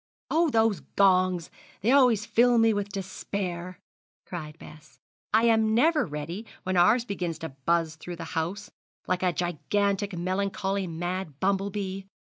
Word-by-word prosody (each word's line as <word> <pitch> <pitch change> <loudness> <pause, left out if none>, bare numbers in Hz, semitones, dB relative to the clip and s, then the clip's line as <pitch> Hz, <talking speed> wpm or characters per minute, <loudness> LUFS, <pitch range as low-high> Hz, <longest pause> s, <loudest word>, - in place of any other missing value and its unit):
'Oh, 330 +1 +3
those 225 -5 +2 0.2
gongs, 185 -3 +3 0.3
they 225 +5 +2
always 250 -7 +5
fill 240 +1 +4
me 225 -1 +5
with 205 -1 -2
despair!' 185 -2 -5 0.5
cried 155 -3 -7
Bess. 155 -2 -14 0.3
'I 220 +2 +4
am 220 -1 +3
never 300 - +3
ready 165 +8 -6 0.2
when 185 0 -1
ours 220 +7 +4
begins 180 -7 -3
to 160 - -6 0.2
buzz 165 -2 +1
through 175 +3 -7
the 170 - -7
house, 180 +6 -3 0.3
like 180 0 -1
a 185 -1 +2
gigantic, 195 +4 -1
melancholy 195 +1 -1
mad 175 -2 -4
bumble 195 +1 +1
bee. 195 -1 -5
190 Hz, 145 wpm, -27 LUFS, 175-210 Hz, 0.5 s, always